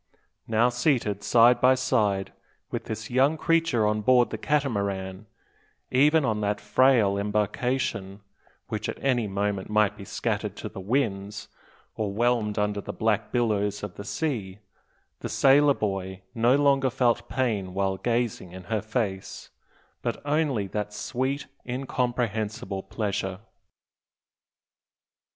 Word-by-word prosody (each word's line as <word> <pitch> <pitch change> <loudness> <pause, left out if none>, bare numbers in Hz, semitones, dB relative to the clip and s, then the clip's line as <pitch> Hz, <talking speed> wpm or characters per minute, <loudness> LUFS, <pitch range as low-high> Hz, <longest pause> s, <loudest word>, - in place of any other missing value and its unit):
Now, 115 +2 +3
seated 120 - 0
side 120 +3 +5
by 130 +1 +6
side 105 -7 0 0.4
with - - -4
this - - -6
young 135 +5 +3
creature 165 -9 +2
on 105 0 +1
board 120 0 +4
the - - -3
Catamaran, 100 -8 -1 0.6
even 150 +3 +4
on 110 -3 0
that 105 0 0
frail 115 -7 +3
embarkation, 105 0 -1 0.5
which - - -3
at - - -4
any 125 -5 +2
moment 100 0 -2
might 105 -1 +2
be 100 - -10
scattered - - -2
to - - -6
the - - -9
winds, 105 -2 -2 0.4
or 105 -2 -2
whelmed 115 -1 +1
under 105 0 0
the - - -6
black 110 -1 0
billows 105 -4 0
of 105 -3 -5
the 100 - -8
sea, 105 -6 -3 0.6
the - - -5
sailor 140 +1 +5
boy 95 -2 -3
no 120 +3 +3
longer 140 -2 +3
felt 120 -2 +1
pain 105 -5 -1
while 95 -1 0
gazing 115 -6 -1
in 95 0 -9
her 110 - +1
face, 105 -3 -4 0.5
but - - -2
only 145 -8 +1
that 105 +2 -4
sweet 135 +5 -2 0.2
incomprehensible 120 -5 -2
pleasure. 95 -3 -3
110 Hz, 130 wpm, -26 LUFS, 100-130 Hz, 0.6 s, by